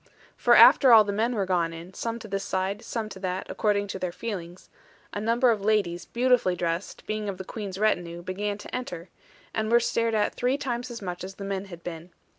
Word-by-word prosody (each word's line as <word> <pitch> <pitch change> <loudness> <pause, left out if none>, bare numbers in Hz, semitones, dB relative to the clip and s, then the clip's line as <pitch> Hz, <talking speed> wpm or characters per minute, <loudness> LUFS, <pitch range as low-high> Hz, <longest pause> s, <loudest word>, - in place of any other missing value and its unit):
For - - +4
after 265 -4 +8
all 220 -2 +9
the 200 -1 -3
men 230 +4 0
were 200 -3 0
gone, 170 -1 -2
some 230 +3 -3
to 220 - -9
this 195 -1 -3
side, 190 +3 -2
some 225 -2 -3
to 190 - -9
that, 185 0 -3
according 205 -1 +1
to 190 - -4
their 180 -1 -2
feelings, 180 -3 -6 0.5
a 205 - -3
number 235 +3 +3
of 215 -3 -1
ladies, 200 -5 +1
beautifully 245 -6 +2
dressed, 170 +1 -3
being 215 -1 -3
of 190 - -5
the 190 - -6
Queen's 200 -3 -6
retinue, 175 -5 0
began 200 +3 -3
to - - -8
enter, 180 -9 -5 0.4
and 220 0 -1
were 235 - +7
stared 230 -1 0
at 210 - +1
three 250 +3 0
times 245 -3 -3
as 230 -3 -7
much 180 -1 -5
as 190 +1 -7
the 200 - -8
men 195 0 -3
had 175 -3 -11
been. 170 0 -7
200 Hz, 220 wpm, -26 LUFS, 180-225 Hz, 0.5 s, all